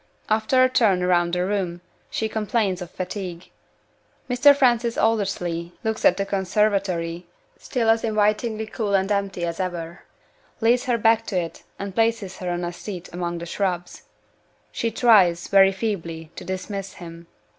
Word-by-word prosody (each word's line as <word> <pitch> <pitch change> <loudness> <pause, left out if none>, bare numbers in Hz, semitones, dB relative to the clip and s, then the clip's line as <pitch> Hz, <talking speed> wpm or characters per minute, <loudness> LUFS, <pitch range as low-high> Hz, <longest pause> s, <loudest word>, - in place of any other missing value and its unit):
After 220 +4 +3
a - - +6
turn 215 -8 +3
round 175 -1 +2
the 180 0 +1
room, 185 -3 -2 0.3
she 220 - -1
complains 210 -3 -1
of 175 - -6
fatigue. 180 -1 -6 0.8
Mr. 265 +3 +6
Francis 240 -4 +2
Aldersley 175 -6 0
looks 220 0 -2
at 180 - +5
the 195 - -1
conservatory 190 -3 0 0.3
(still 240 -4 -2
as 225 0 +3
invitingly 215 +1 +1
cool 215 -2 -1
and 195 +1 +1
empty 195 -3 -1
as 170 +1 -4
ever); 175 -2 -4 0.6
leads 240 +2 +3
her 245 -2 +1
back 225 0 +3
to 185 - 0
it; 170 -1 -6 0.2
and 200 -1 -5
places 225 -3 0
her 180 - -4
on 175 0 -2
a 175 - -4
seat 180 -2 -8
among 175 -1 -3
the 170 - -6
shrubs. 175 -1 -3 0.7
She 230 - -1
tries 200 -7 +4
very 195 -1 +6
feebly 170 -6 -4
to - - -8
dismiss 190 +1 -5
him. 170 -2 -11
195 Hz, 155 wpm, -23 LUFS, 175-220 Hz, 0.8 s, a